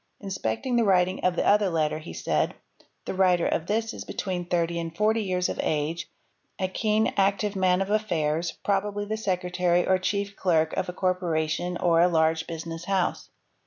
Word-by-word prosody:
Inspecting 195 - -2
the 235 - +4
writing 185 -2 +2
of 180 -1 +2
the - - 0
other 205 -1 +4
letter 155 -2 0
he 160 - -9
said, - - -1 0.2
— - - -32
"The - - -3
writer 185 -2 +3
of 165 - -1
this 225 +2 -1
is - - -7
between 180 -3 -4
thirty 170 -1 0
and 165 0 -6
forty 220 +1 +2
years 180 -3 0
of - - -5
age, 160 +3 -2 0.5
a 185 - 0
keen, 215 +3 +1
active 200 +1 +1
man 185 0 +2
of 195 - -6
affairs, 170 -6 0
probably 205 +1 0
the 215 +1 -2
secretary 180 -3 0
or 185 0 +3
chief 200 +1 -2
clerk 160 -4 +1
of 190 -1 -2
a - - -4
corpora 180 -4 0
tion 175 +3 -2
or 170 -2 +3
a 175 - +6
large 160 -1 +1
business 165 0 -6
house. 190 -2 -1
180 Hz, 190 wpm, -26 LUFS, 170-200 Hz, 0.5 s, a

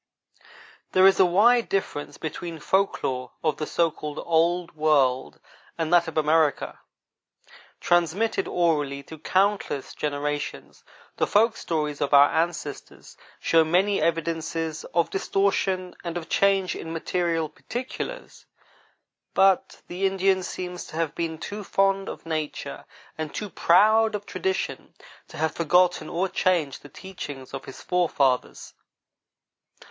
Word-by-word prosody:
There 185 0 +6
is 195 0 +6
a 190 - +6
wide 230 +7 +4
difference 190 -6 -3
between 165 +1 -5
folk 190 +6 0
lore 125 -1 -3
of 155 -2 +1
the 155 - -3
so 170 -1 +1
called 150 -1 -7
Old 170 +1 +1
World 135 - +2 0.4
and 165 0 -1
that 175 -1 +5
of 160 - -6
America. 155 -1 +1 1.0
Transmitted 175 +6 +1
orally 150 -5 0
through 160 +2 -11
countless 190 -5 0
generations, 145 0 -4 0.3
the - - +1
folk 225 +2 +3
stories 150 -3 -3
of 145 0 +3
our 140 +1 +7
ancestors 160 -3 -3 0.2
show 165 -1 +4
many 185 +5 +2
evidences 165 -1 -2
of 170 -1 0
distortion 190 -2 0
and 170 -1 -4
of 165 - -6
change 195 -2 +2
in 160 - -7
material 165 -1 -1
particulars; 245 - -7 0.9
but 195 -1 +3
the 185 +2 0
Indian 190 0 +2
seems 180 0 -5
to - - -11
have 165 -2 -1
been 165 -1 -3
too 205 +5 -6
fond 195 0 +1
of - - -9
nature 155 -2 -4 0.3
and 155 -2 -4
too 210 -3 -4
proud 215 +6 +4
of 205 0 -5
tradition 380 - -3 0.3
to - - -12
have 160 0 0
forgotten 175 -1 +2
or 180 +3 0
changed 175 -7 0
the 145 - -13
teachings 145 -7 -9
of 135 - -6
his 135 - -10
forefathers. 145 -8 0
170 Hz, 130 wpm, -25 LUFS, 155-190 Hz, 1.0 s, our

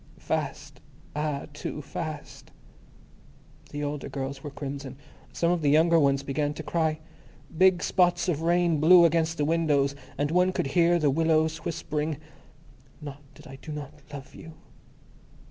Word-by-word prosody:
Fast! - - -4 0.4
Ah, 150 -2 -2
too 145 - -5
Fast. 150 +1 -7 1.2
The 145 0 -5
older 145 -1 -4
girls 135 0 -5
were 145 - -5
crimson; 140 -1 -6 0.3
some 170 0 +1
of 175 -2 0
the 145 - +2
younger 165 +3 +5
ones 140 -2 +2
began 145 +1 -1
to - - -6
cry. 160 -2 0 0.6
Big 185 0 +4
spots 175 -1 +2
of 160 -4 0
rain 170 -1 +2
blew 170 +3 +7
against 165 0 +1
the 145 - +1
windows, 150 -4 +2 0.2
and 145 +2 0
one 180 +2 +3
could - - -1
hear 175 0 +4
the 150 -4 +2
willows 160 +1 +2
whispering, 155 -2 -3 0.4
"... 135 -4 -27
not 145 -2 -9
that - - -15
I 135 - -10
do 155 - -9
not 150 -2 -6 0.2
love 140 -2 -9
you...." 160 0 -11
155 Hz, 155 wpm, -27 LUFS, 140-165 Hz, 1.2 s, blew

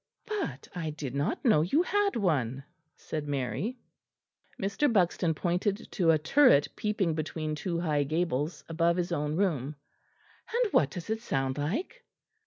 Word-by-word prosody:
"But 425 -3 -4
I 165 -4 -3
did 150 -4 -5
not 140 - -1
know 215 -11 +5
you 240 - +2
had 405 +1 +1
one," 140 - 0 0.3
said 155 -2 -5
Mary. 145 - -2 0.8
Mr. 205 +9 +1
Buxton 175 -5 +2
pointed 190 +6 -1
to 175 -5 +2
a 160 - +6
turret 160 - +5
peeping 210 -6 0
between 155 0 -3
two 170 +3 -2
high 155 -4 +1
gables, 155 0 -1
above 170 +1 +1
his 175 0 -1
own 150 -2 -1
room. 155 -7 0 0.8
"And 470 -2 +1
what 140 - +4
does 175 +7 -6
it 220 0 -1
sound 135 - -1
like?" 305 - -3
170 Hz, 150 wpm, -29 LUFS, 150-210 Hz, 0.8 s, a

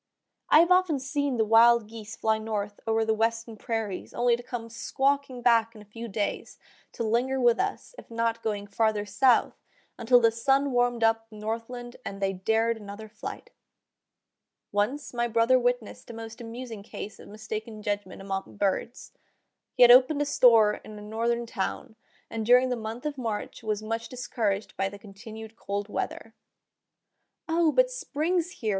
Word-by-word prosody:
I 310 - +8
have 340 +2 +2
often 365 -5 +4
seen 275 0 -2
the 220 - +2
wild 230 +1 +6
geese 220 -1 -9
fly 220 0 +1
north 205 -2 -4
over 225 0 +2
the 220 - +2
western 225 +1 -1
prairies 220 -4 -4
only 240 0 +3
to 240 - -8
come 240 -2 -6
squawking 265 +2 -1
back 230 -1 +3
in 215 - -11
a 205 0 -27
few 235 0 -6
days, 205 -1 -3 0.4
to - - -3
linger 245 +4 +1
with 240 -2 +4
us, 400 +5 -3
if - - -14
not 230 0 -1
going 205 -2 -2
farther 215 0 0
south, 255 +4 +3 0.5
until 245 +1 +5
the 230 -1 +4
sun 270 +4 +1
warmed 245 -1 +1
up 225 0 +2
the 215 - -14
northland 230 +3 -5
and 195 - -6
they 195 -1 0
dared 225 +4 +1
another 210 +1 -9
flight. 215 +1 -8 1.2
Once 230 +9 -1
my 240 0 0
brother 230 +3 +3
witnessed 245 -3 -2
a 235 - -8
most 225 +1 -8
amusing 230 -2 -7
case 210 0 -8
of - - -12
mistaken 215 +1 -7
judgment 205 -2 -3
among 195 0 -5
birds. 205 +4 -2 0.6
He 250 - +6
had 240 - +9
opened 265 +4 +6
a - - -3
store 225 -6 +5
in 215 - -10
a - - -9
northern 230 +2 -1
town, 220 -1 -4 0.3
and 225 -1 -4
during 250 +3 +5
the 250 - 0
month 225 +3 -6
of 290 -3 -3
March 225 -4 -4
was 215 -1 -2
much 225 +1 -3
discouraged 220 -5 -2
by 195 +1 -1
the 205 - -10
continued 220 +2 -11
cold 200 -1 -4
weather. 225 +2 -4 1.1
"O! 325 -1 +3
but - - +3
spring's 345 - -1
here!" 230 - -4
230 Hz, 175 wpm, -27 LUFS, 215-245 Hz, 1.2 s, had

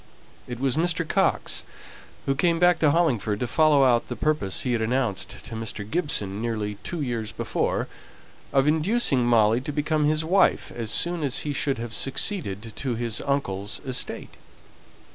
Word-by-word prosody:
It 120 -1 -6
was 135 +1 0
Mr. 170 0 +1
Coxe, - - +1 0.6
who 135 - +2
came 165 +4 +2
back 175 0 +4
to 155 - +4
Hollingford 125 - +1
to - - -1
follow 150 +1 +4
out 120 -3 +3
the 125 - -4
purpose 150 -6 0
he 125 - -1
had 115 - 0
announced 110 -6 -2
to - - -6
Mr. 110 -2 -5
Gibson 110 - -1
nearly 110 -3 -3
two 175 -4 -4
years 115 -5 -3
before, - - -1 0.6
of 135 -1 +3
inducing 155 - +2
Molly 115 0 +4
to 140 - -4
become 150 +1 0
his 155 +1 +1
wife 190 +4 +2
as 115 -2 -4
soon 175 +7 +1
as 140 -1 0
he 150 - -3
should 140 -1 0
have 115 0 -6
succeeded 115 - -1
to 130 -4 -2
his 115 -2 -2
uncle's 100 -8 -1
estate. 130 -2 -3
130 Hz, 165 wpm, -25 LUFS, 110-155 Hz, 0.6 s, back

